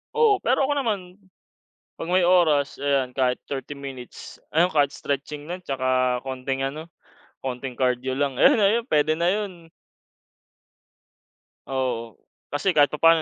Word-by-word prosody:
Oo 450 Hz, -4 st, +4 dB
pero 265 Hz, +3 st, +2 dB
ako 290 Hz, -, +1 dB
naman, 230 Hz, -8 st, 0 dB, 0.9 s
pag 165 Hz, -, -7 dB
may 180 Hz, 0 st, +3 dB
oras 155 Hz, -7 st, +3 dB
ayan, 135 Hz, -3 st, +1 dB
kahit 125 Hz, -2 st, +1 dB
30 140 Hz, +1 st, -6 dB
minutes, 135 Hz, -3 st, -9 dB
ayun 175 Hz, +4 st, +2 dB
kahit 145 Hz, -2 st, +3 dB
stretching 145 Hz, +1 st, -4 dB
lang 180 Hz, +3 st, -6 dB
tsaka 130 Hz, -3 st, 0 dB
konting 135 Hz, 0 st, -3 dB
ano, 155 Hz, +4 st, -6 dB, 0.5 s
konting 130 Hz, 0 st, -4 dB
cardio 130 Hz, +1 st, 0 dB
lang 135 Hz, -1 st, -1 dB
ayun -, -, +6 dB
ayun 220 Hz, +4 st, +3 dB
pwede 150 Hz, -, +2 dB
na 170 Hz, +1 st, +2 dB
yun. 205 Hz, -2 st, -3 dB, 2.2 s
Oo. 120 Hz, -5 st, -2 dB, 0.3 s
Kasi 145 Hz, +7 st, 0 dB
kahit 145 Hz, -4 st, +4 dB
papaano 165 Hz, +2 st, +4 dB
145 Hz, 135 wpm, -24 LUFS, 130-175 Hz, 2.2 s, ayun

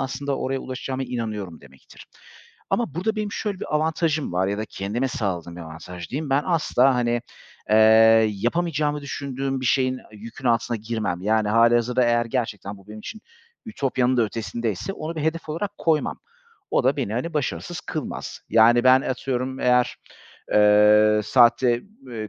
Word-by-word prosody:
aslında 135 Hz, +1 st, -3 dB
oraya 135 Hz, +1 st, -2 dB
ulaşacağıma 130 Hz, +1 st, -5 dB
inanıyorum 110 Hz, -8 st, -5 dB
demektir. 65 Hz, -1 st, -17 dB, 0.6 s
Ama 235 Hz, -, -1 dB
burada 215 Hz, +6 st, -1 dB
benim 210 Hz, -1 st, -3 dB
şöyle 205 Hz, -3 st, -4 dB
bir -, -, -4 dB
avantajım 155 Hz, -, 0 dB
var 90 Hz, +2 st, +1 dB
ya 100 Hz, +1 st, -2 dB
da 110 Hz, -, -2 dB
kendime 110 Hz, +5 st, -3 dB
sağladığım 90 Hz, -7 st, -4 dB
bir -, -, -8 dB
avantaj 85 Hz, +2 st, -9 dB
diyeyim. 145 Hz, +1 st, -4 dB
Ben 140 Hz, +2 st, +3 dB
asla, 135 Hz, -6 st, +2 dB
hani, 120 Hz, -1 st, 0 dB, 0.5 s
eee, 110 Hz, -, +5 dB, 0.5 s
yapamayacağımı 150 Hz, -, -1 dB
düşündüğüm 135 Hz, -1 st, -4 dB
bir 130 Hz, -, -2 dB
şeyin, 130 Hz, 0 st, +1 dB
yükün 115 Hz, +4 st, -9 dB
altına 115 Hz, 0 st, +1 dB
girmem. 110 Hz, -5 st, -3 dB
Yani, 110 Hz, +1 st, +1 dB
hâlihazırda 120 Hz, +3 st, +3 dB
eğer 120 Hz, 0 st, +2 dB
gerçekten 110 Hz, -5 st, -3 dB
bu 100 Hz, -, -20 dB
benim 105 Hz, 0 st, -9 dB
için 215 Hz, -, -8 dB, 0.5 s
ütopyanın 130 Hz, -, 0 dB
da 120 Hz, -, +4 dB
ötesindeyse 115 Hz, -, -3 dB
onu 160 Hz, -2 st, -6 dB
bir 155 Hz, -, -3 dB
hedef 160 Hz, +2 st, -2 dB
olarak 170 Hz, +7 st, -3 dB
koymam. 160 Hz, -2 st, 0 dB, 0.5 s
O -, -, +1 dB
da 135 Hz, +2 st, +2 dB
beni, 120 Hz, -7 st, -2 dB
hani, 155 Hz, +8 st, -3 dB
başarısız 170 Hz, +4 st, -3 dB
kılmaz. 155 Hz, -4 st, -6 dB
Yani 120 Hz, +2 st, +5 dB
ben 130 Hz, +1 st, +6 dB
atıyorum 130 Hz, 0 st, -3 dB
eğer, 125 Hz, 0 st, +2 dB, 0.6 s
eee 105 Hz, +1 st, +5 dB
saatte 120 Hz, 0 st, +4 dB
b 135 Hz, -, -12 dB
eee, 110 Hz, -, -6 dB
125 Hz, 160 wpm, -23 LUFS, 110-140 Hz, 0.6 s, ben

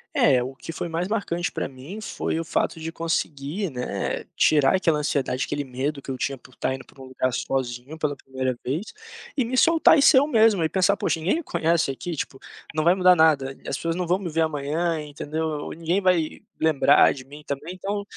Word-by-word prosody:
É, 130 Hz, -4 st, +4 dB
o 130 Hz, +2 st, -6 dB
que 165 Hz, -, -8 dB
foi 170 Hz, -, -4 dB
mais 165 Hz, +2 st, -2 dB
marcante 180 Hz, -5 st, -2 dB
pra -, -, -3 dB
mim 135 Hz, +11 st, -9 dB
foi 165 Hz, -, -3 dB
o -, -, -2 dB
fato 165 Hz, -, -1 dB
de 160 Hz, +1 st, -5 dB
conseguir, 165 Hz, +2 st, -2 dB
né, 125 Hz, -3 st, -3 dB
tirar 145 Hz, -3 st, +4 dB
aquela 165 Hz, -5 st, +2 dB
ansiedade, 140 Hz, -3 st, -1 dB
aquele 145 Hz, 0 st, -3 dB
medo 140 Hz, +2 st, -3 dB
que -, -, -11 dB
eu 130 Hz, -, -3 dB
tinha 135 Hz, +2 st, -1 dB
por 125 Hz, -, -19 dB
estar -, -, -1 dB
indo 130 Hz, 0 st, -7 dB
para -, -, -20 dB
um -, -, -9 dB
lugar 130 Hz, 0 st, -1 dB
sozinho, 125 Hz, +2 st, -3 dB
pela 150 Hz, -2 st, -1 dB
primeira 130 Hz, -2 st, -3 dB
vez, 155 Hz, -, -3 dB, 0.5 s
e 260 Hz, -, +2 dB
me 250 Hz, +3 st, -3 dB
soltar 325 Hz, +2 st, +6 dB
e -, -, +4 dB
ser 280 Hz, 0 st, +7 dB
eu 280 Hz, +2 st, +5 dB
mesmo 220 Hz, -, +4 dB
e -, -, +3 dB
pensar: 195 Hz, +3 st, +2 dB
"Poxa -, -, 0 dB
ninguém 195 Hz, -, 0 dB
conhece 165 Hz, -, +1 dB
aqui 170 Hz, +5 st, -5 dB
tipo, 135 Hz, -2 st, -5 dB, 0.3 s
não 155 Hz, 0 st, 0 dB
vai 175 Hz, +3 st, +5 dB
mudar 185 Hz, -1 st, +6 dB
nada, 155 Hz, -5 st, +3 dB
e -, -, -6 dB
as -, -, -1 dB
pessoas 165 Hz, 0 st, -2 dB
não 180 Hz, -1 st, -2 dB
vão 180 Hz, +2 st, +3 dB
me 185 Hz, -3 st, -4 dB
ver 165 Hz, +1 st, +1 dB
amanhã", 160 Hz, +2 st, 0 dB
entendeu, 150 Hz, +2 st, -4 dB
ou: 150 Hz, -2 st, -4 dB
"Ninguém 170 Hz, +4 st, 0 dB
vai 180 Hz, -4 st, +1 dB, 0.2 s
lembrar 155 Hz, -3 st, +5 dB
de 130 Hz, -, -9 dB
mim 145 Hz, +3 st, -12 dB
também", 145 Hz, +6 st, -5 dB
então, 200 Hz, +2 st, -3 dB
160 Hz, 220 wpm, -24 LUFS, 140-180 Hz, 0.5 s, ser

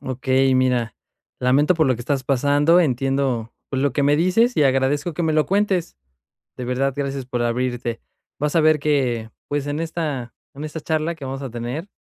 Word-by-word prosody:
Okey, 130 Hz, +1 st, +1 dB
mira, 125 Hz, -4 st, +1 dB, 0.4 s
lamento 140 Hz, +7 st, +3 dB
por 160 Hz, -3 st, +2 dB
lo 130 Hz, -, +3 dB
que 115 Hz, -, -8 dB
estás 130 Hz, +1 st, -2 dB
pasando, 145 Hz, +6 st, +3 dB
entiendo 135 Hz, -4 st, 0 dB, 0.2 s
lo 135 Hz, +1 st, 0 dB
que 145 Hz, -, 0 dB
me 145 Hz, +1 st, +4 dB
dices 220 Hz, +9 st, +2 dB
y 150 Hz, -, +4 dB
agradezco 135 Hz, +5 st, +1 dB
que 175 Hz, -, -2 dB
me 160 Hz, -1 st, +1 dB
lo 155 Hz, 0 st, +2 dB
cuentes, 195 Hz, -, 0 dB, 0.6 s
de 125 Hz, -, -5 dB
verdad 130 Hz, +2 st, 0 dB
gracias 140 Hz, -2 st, -3 dB
por 125 Hz, -1 st, -3 dB
abrirte. 120 Hz, -1 st, -2 dB, 0.4 s
Vas 150 Hz, +2 st, -1 dB
a 165 Hz, -, +5 dB
ver 155 Hz, -1 st, +4 dB
que, 125 Hz, -7 st, 0 dB, 0.2 s
pues, 145 Hz, -1 st, -2 dB
en 145 Hz, +2 st, -2 dB
esta 155 Hz, -7 st, -3 dB, 0.2 s
en 145 Hz, -, -7 dB
esta 155 Hz, +1 st, -6 dB
charla 160 Hz, +2 st, -1 dB
que 145 Hz, -, -11 dB
vamos 135 Hz, +1 st, -5 dB
a 135 Hz, -, -5 dB
tener, 120 Hz, -, -5 dB
140 Hz, 190 wpm, -22 LUFS, 130-155 Hz, 0.6 s, a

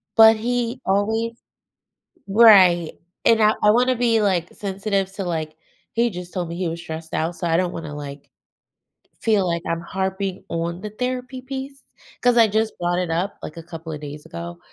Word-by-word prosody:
But 225 Hz, 0 st, +8 dB
he 240 Hz, +2 st, -2 dB
always 220 Hz, +4 st, +1 dB, 0.9 s
right, 195 Hz, -6 st, +6 dB, 0.3 s
and 230 Hz, -1 st, +5 dB
I 215 Hz, 0 st, +5 dB
I 210 Hz, -, +7 dB
wanna 250 Hz, +3 st, +3 dB
be, 230 Hz, -2 st, +2 dB
like, 180 Hz, -4 st, 0 dB
sensitive 195 Hz, -1 st, -2 dB
to, 195 Hz, -, -4 dB
like 160 Hz, -3 st, -3 dB, 0.4 s
he 235 Hz, +1 st, +2 dB
just 180 Hz, -3 st, -8 dB
told 180 Hz, -3 st, -2 dB
me 170 Hz, -, -6 dB
he 180 Hz, 0 st, -2 dB
was 165 Hz, +1 st, -5 dB
stressed 160 Hz, 0 st, -8 dB
out, 165 Hz, +2 st, -1 dB
so 175 Hz, -, -3 dB
I 165 Hz, -, +2 dB
don't 180 Hz, -1 st, 0 dB
wanna, 155 Hz, -3 st, -6 dB
like, 140 Hz, -1 st, -8 dB, 0.9 s
feel 210 Hz, -4 st, +2 dB
like 170 Hz, -1 st, -1 dB
I'm 165 Hz, 0 st, -1 dB
harping 190 Hz, +1 st, -3 dB
on 170 Hz, +1 st, -3 dB
the 210 Hz, -, -5 dB
therapy 255 Hz, +3 st, -4 dB
piece 270 Hz, +1 st, -7 dB, 0.4 s
'cause 245 Hz, -1 st, +3 dB
I 230 Hz, -, +7 dB
just 220 Hz, +1 st, -1 dB
brought 175 Hz, 0 st, 0 dB
it 180 Hz, -2 st, -1 dB
up, 175 Hz, +5 st, -1 dB
like, 155 Hz, -, -7 dB
a 165 Hz, -, -7 dB
couple 165 Hz, 0 st, -9 dB
of 150 Hz, -, -6 dB
days 150 Hz, 0 st, -8 dB
ago, 85 Hz, +1 st, -7 dB
190 Hz, 185 wpm, -22 LUFS, 170-225 Hz, 0.9 s, But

